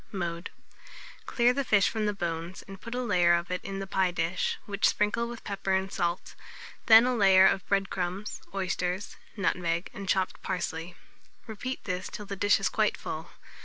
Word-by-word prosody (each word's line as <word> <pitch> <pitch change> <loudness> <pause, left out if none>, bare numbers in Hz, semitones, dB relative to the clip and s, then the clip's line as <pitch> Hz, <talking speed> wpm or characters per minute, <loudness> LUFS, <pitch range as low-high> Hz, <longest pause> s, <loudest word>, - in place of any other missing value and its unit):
Mode. 175 -2 -4 0.8
Clear 240 0 +3
the 275 +1 -1
fish 205 -6 +4
from 215 -2 -1
the - - +2
bones, 170 -1 -4
and 195 0 -11
put 230 +1 -6
a 250 - -1
layer 175 -6 +4
of 170 +1 -3
it 180 - -3
in 195 0 -5
a - - -5
pie 190 -1 +1
dish, 175 +1 -1
which 205 0 +2
sprinkle 220 +3 0
with 235 -1 -8
pepper 195 -1 -2
and 190 +1 -1
salt; 170 +1 -2 0.5
then 225 +1 +9
a 255 - +2
layer 195 -4 +6
of 190 -1 +2
bread 195 -1 +1
crumbs, 185 +3 -3
oysters, 185 0 -2 0.2
nutmeg, 175 -3 -1
and 195 -1 -7
chopped 190 -1 0
parsley. 175 -2 -4 0.5
Repeat 245 +4 -5
this 180 0 -3
till 210 - -7
the 200 - -5
dish 205 +1 +3
is - - +1
quite - - +1
full. - - -6
195 Hz, 185 wpm, -28 LUFS, 180-210 Hz, 0.8 s, then